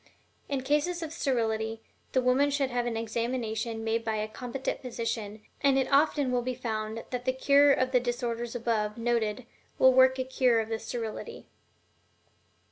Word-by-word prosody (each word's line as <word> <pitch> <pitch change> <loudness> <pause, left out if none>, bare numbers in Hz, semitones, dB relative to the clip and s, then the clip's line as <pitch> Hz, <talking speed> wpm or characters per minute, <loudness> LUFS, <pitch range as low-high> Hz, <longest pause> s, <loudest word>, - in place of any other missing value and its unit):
In 275 -2 -1
cases 300 +5 0
of 320 -1 -6
sterility, 225 -6 -1 0.3
the 260 - +2
woman 260 +3 +3
should 275 -2 0
have 245 0 -1
an 230 -2 -2
examination 230 0 -2
made 225 +1 0
by 220 -1 -1
a 215 0 -2
competent 250 +4 -4
physician, 225 -4 -4 0.2
and 275 -1 +4
it 265 -1 +2
often 285 -2 +3
will 250 -1 +1
be 255 +1 -3
found 220 -2 -4
that 250 -1 -3
the 260 - +3
cure 280 +2 +5
of 255 -1 +2
the 250 - +4
disorders 240 -1 -3
above 225 -3 -1
noted 230 -1 -1 0.3
will 260 0 +6
work 260 0 +5
a 260 - 0
cure 255 -2 +2
of 220 0 -3
the 225 -1 -2
sterility. 235 - -6
245 Hz, 170 wpm, -29 LUFS, 225-260 Hz, 0.3 s, will